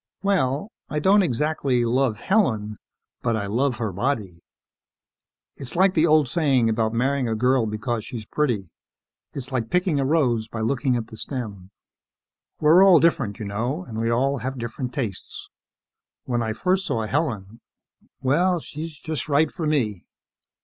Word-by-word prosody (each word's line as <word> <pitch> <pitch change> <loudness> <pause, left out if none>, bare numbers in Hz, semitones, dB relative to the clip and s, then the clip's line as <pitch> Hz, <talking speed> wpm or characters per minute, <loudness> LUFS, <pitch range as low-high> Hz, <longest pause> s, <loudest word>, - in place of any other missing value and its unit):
"Well, 190 - 0 0.2
I 150 - -3
don't 195 +7 +4
exactly 140 -4 0
love 120 -2 +1
Helen, 110 - +1 0.4
but 115 -2 0
I 105 -2 -2
love 120 +5 0
her 110 -3 -2
body. 100 -5 -2 1.2
It's 135 +1 -4
like 190 +2 +4
the 165 -1 +3
old 155 -3 +4
saying 135 -5 +2
about 110 0 0
marrying 130 +2 0
a 110 - 0
girl 125 +1 +2
because 110 +1 -3
she's 115 -3 -7
pretty 110 - -1 0.6
is 130 -1 -6
like 120 -4 -2
picking 180 -4 +1
a - - +1
rose 125 -7 +1
by 115 0 -5
looking 130 +3 +1
at 115 -2 -2
the 110 - -10
stem. 105 -8 -5 0.9
We're 160 +5 +6
all 185 -4 +7
different, 135 -11 +1
you 110 - -6
know, 120 - -2
and 110 -1 -6
we 115 0 0
all 135 +4 +1
have 130 +3 -4
different 120 +2 -4
tastes. 115 -8 -5 0.8
When 120 -1 -1
I 110 -1 -1
first 190 - 0
saw 115 -1 -1
Helen 115 -6 -2 0.6
Well, 175 +7 +2
she's 155 0 -7
just 155 -2 -4
right 150 +2 +3
for 165 -4 -3
me. 110 - -1
130 Hz, 160 wpm, -24 LUFS, 110-150 Hz, 1.2 s, all